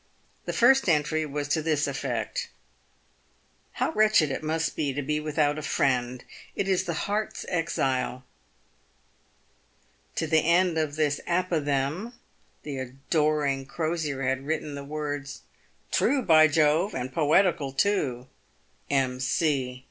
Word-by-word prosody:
The - - -2
first 265 -2 +4
entry 155 0 +1
was 145 0 -3
to 160 +2 +1
this 155 -2 +1
effect: 130 -5 -3 0.6
" - - -39
How - - -1
wretched 215 -9 +3
it 135 - -3
must 160 +1 -1
be 145 -3 -1
to 145 +2 -3
be 150 +2 -1
without 150 -1 0
a - - -5
friend! 125 -3 0 0.3
It 195 - -1
is 190 -2 +1
the 170 - -2
heart's 210 +1 -2
exile." 130 -7 -1 1.9
To - - -1
the 160 0 +3
end 170 +1 +2
of 150 -2 -1
this 150 -2 0
apothegm 170 - -1 0.5
the 140 -3 -5
adoring 140 +1 -1
Crosier 155 -3 -2
had 130 0 0
added 150 +1 -3
the 140 - -6
words: 145 -1 -5 0.2
" - - -37
True, 275 -2 +2
by 155 -5 +6
Jove! 155 +5 +2
and 125 +1 -4
poetical, 155 -2 +2
too. 135 -7 0 0.3
— - - -38
M. 130 -2 +1
C." 130 -2 0
150 Hz, 140 wpm, -26 LUFS, 135-165 Hz, 1.9 s, by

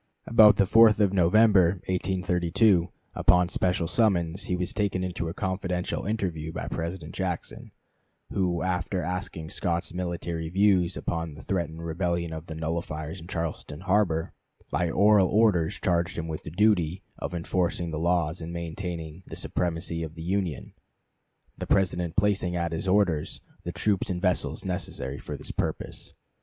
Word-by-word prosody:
About 110 -2 +7
the - - +4
4th 110 +2 +6
of 100 -2 +3
November, 95 0 +5
1832, 90 0 +2 0.2
upon 90 0 +4
special 90 -2 0
summons, 90 -2 +1
he 90 - -1
was 90 0 -2
taken 100 -3 0
into 90 -2 -3
a - - -5
confidential 95 -2 -2
interview 90 -8 -2
by 80 - -5
President 85 -1 -4
Jackson, 90 -3 -4 0.6
who, 90 -3 0
after 90 0 -1
asking 90 -3 -4
Scott's 85 -1 -1
military 85 -2 -3
views 95 -1 +3
upon 80 -3 -3
the 75 - -11
threatened 85 -3 -3
rebellion 85 0 -1
of 80 +1 -7
the 80 - -6
nullifiers 80 0 -4
in 85 - -11
Charleston 85 -3 -4
harbor, 95 -4 +1 0.4
by 85 +4 +1
oral 100 +2 +5
orders 100 -7 +2
charged 85 -2 0
him 85 -1 -3
with 80 -1 -4
the - - -7
duty 95 -1 +2 0.2
of - - -4
enforcing 85 0 -1
the 75 - -3
laws 85 -1 +1
and 80 +1 -6
maintaining 85 -1 -5
the - - -7
supremacy 85 -1 -2
of 80 -1 -6
the 80 - -7
Union; 90 -4 -2 0.9
the - - -4
President 90 -3 +1
placing 100 -4 +1
at 85 -1 -1
his 80 +3 -3
orders 90 -6 +1 0.3
the - - -2
troops 100 -3 0
and 90 -1 -1
vessels 90 0 0
necessary 90 -7 -3
for - - -6
this - - -6
purpose. - - -4
90 Hz, 155 wpm, -27 LUFS, 85-95 Hz, 0.9 s, About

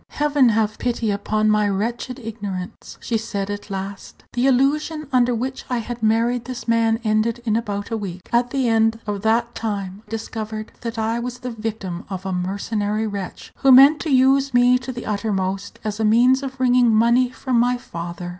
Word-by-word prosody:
"Heaven 290 -4 +3
have 215 -1 0
pity 235 -3 -1
upon 215 +1 +1
my 210 -1 +2
wretched 235 +5 -2
ignorance!" 205 -6 -7
she 230 -2 -1
said 205 -2 -4
at 205 +1 -6
last; 195 0 -7
"the 245 +2 +2
illusion 295 +4 +1
under 245 -1 +3
which 260 +3 -4
I 250 - 0
had 235 +1 -5
married 230 +2 +1
this 250 -1 -7
man 225 -1 +2
ended 220 +2 +1
in 220 -2 +1
about 205 -3 -3
a 225 - 0
week. 185 -3 -7
At 240 +1 +3
the 265 0 0
end 225 0 +2
of 205 -2 -3
that 230 +2 +1
time 200 -3 -4
I - - -22
discovered 220 -1 -5
that 230 -1 -5
I 225 +1 0
was 245 +1 -5
the 250 0 -6
victim 215 -6 -5
of 190 -1 -6
a 190 - -2
mercenary 205 +4 -2
wretch, 200 -3 -6
who 270 - +4
meant 275 +4 +8
to 320 - -4
use 270 0 +3
me 245 +1 +5
to 255 +1 -6
the 240 -1 -7
uttermost 195 -2 -2
as 215 0 -3
a - - 0
means 245 +5 +4
of 265 -1 -6
wringing 250 -1 +4
money 235 +3 +4
from 255 -1 -1
my 245 +1 +2
father. 175 -4 -7
225 Hz, 190 wpm, -21 LUFS, 205-245 Hz, -, meant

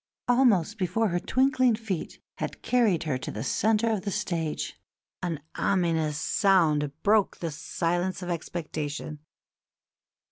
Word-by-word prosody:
Almost 230 -5 +3
before 215 +4 +1
her 175 0 0
twinkling 255 +1 +3
feet 215 -6 -5 0.2
had - - -5
carried 225 -9 +2
her 145 -5 -1
to - - -5
the - - -4
centre 220 +2 +2
of 215 -3 0
the 205 - -3
stage 170 -6 -2 0.4
an 170 -4 -2
ominous 165 -5 +1
sound 155 -5 +3
broke 210 -1 +3
the 165 -2 -3
silence 175 +5 -2
of 180 - -5
expectation. 155 -3 -4
180 Hz, 130 wpm, -27 LUFS, 160-215 Hz, 0.4 s, Almost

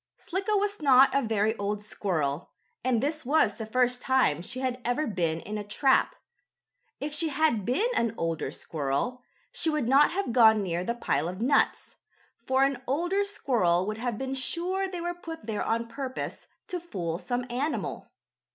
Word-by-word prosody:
Slicko 395 +4 -1
was 405 -2 0
not 270 -2 +6
a 275 - +3
very 220 -2 +1
old 205 +1 -2
squirrel, 165 -8 -2 0.3
and 250 -2 +1
this 305 +2 -2
was 260 -6 +2
the 220 - -5
first 250 +2 +1
time 260 - +2
she 250 +8 -6
had 255 -1 -2
ever 245 +6 0
been 170 - -1
in 210 0 -5
a - - -4
trap. 260 +6 +2 0.8
If 295 +1 -4
she 315 +2 0
had 285 -9 +1
been 260 - +1
an 230 -1 +1
older 165 -1 -2
squirrel, 155 - -3 0.3
she 325 - +1
would 300 -6 0
not 275 +4 +6
have 370 -10 -2
gone 220 -3 +6
near 175 -1 -2
the 235 +5 -2
pile 160 -9 0
of 185 +2 -7
nuts, 255 +6 +1 0.5
for 265 +1 +3
an 275 -2 0
older 350 +9 +1
squirrel 215 - +1
would 215 +2 -4
have 240 -2 -2
been 265 +2 -3
sure 355 +8 -1
they 360 -2 -5
were 350 +1 -2
put 330 -2 -9
there 220 -2 -2
on 230 +1 0
purpose 260 +2 -5 0.2
to 365 -4 -4
fool 175 - -4
some 245 +7 -2
animal. 285 +6 -2
250 Hz, 180 wpm, -28 LUFS, 210-300 Hz, 0.8 s, not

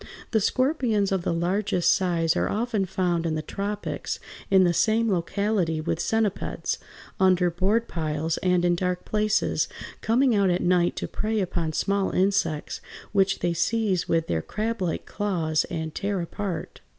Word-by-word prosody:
The 220 - +3
scorpions 245 -5 +1
of 190 -2 +1
the - - -1
largest 180 +2 +1
size 170 -3 +1
are - - +1
often 220 -2 0
found 175 -2 0
in 160 - -1
the 155 - -3
tropics 205 +3 -4 0.3
in 190 -1 +6
the 175 -1 +3
same 225 +4 +2
locality 180 -1 0
with 155 - -2
centipeds, 220 -3 -1 0.4
under 185 -2 +4
board 200 +7 +1
piles 160 0 -2
and 180 -1 +2
in 175 - +4
dark 180 +1 -1
places, 215 0 +1 0.3
coming 245 +3 +3
out 200 -2 +3
at 175 0 +1
night 175 -1 +3
to - - -3
prey 215 +1 -1
upon 175 -4 -1
small 200 +3 +1
insects, 185 -5 0 0.3
which 195 -1 +2
they 175 -1 +1
seize 190 +1 0
with 165 -1 +2
their 80 -1 -1
crablike 210 - -2
claws 170 -7 0
and 160 -2 -4
tear 200 -1 -2
apart. 180 +1 -5
185 Hz, 155 wpm, -25 LUFS, 170-210 Hz, 0.4 s, in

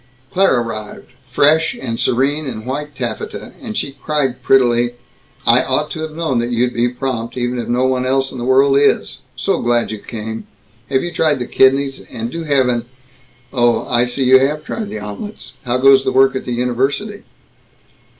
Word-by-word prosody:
Claire 185 -10 +3
arrived, 110 -2 -7
fresh 155 +3 +2
and 115 -3 -4
serene 140 +4 +1
in 110 -3 -6
white 145 +3 -4
taffeta, - - -5
and 225 -4 -5
she 140 - -2
cried 135 -3 -2
prettily, 120 -2 +3 0.5
"I - - +5
ought - - -1
to - - -5
have 155 -1 -5
known 160 -7 0
that 120 +1 -1
you'd 125 +1 0
be 120 +1 +1
prompt 125 -1 -4
even 125 0 -1
if 120 - -4
no 125 +2 +1
one 130 -1 +1
else 135 +1 0
in 130 - -7
the - - -4
world 135 +2 +4
is, 145 - +1 0.2
so - - 0
glad 120 -1 +1
you 110 - -5
came, 110 0 -7 0.4
have 130 -1 +1
you 175 - -3
tried 155 -4 +1
the 125 - -3
kidneys, 135 +2 +2
and 115 +1 -5
do 165 +2 -5
have 140 -4 +2
an 120 -1 -1 0.7
oh, 120 -2 +2
I 120 0 +2
see 125 +2 -2
you 130 +1 +7
have 150 +3 0
tried 215 +6 -4
the - - -5
omelets, 105 - -8
how 125 0 +1
goes 135 +1 +6
the - - 0
work 135 0 +4
at 130 - -4
the 125 - -3
university?" 135 - -1
130 Hz, 190 wpm, -17 LUFS, 120-140 Hz, 0.7 s, you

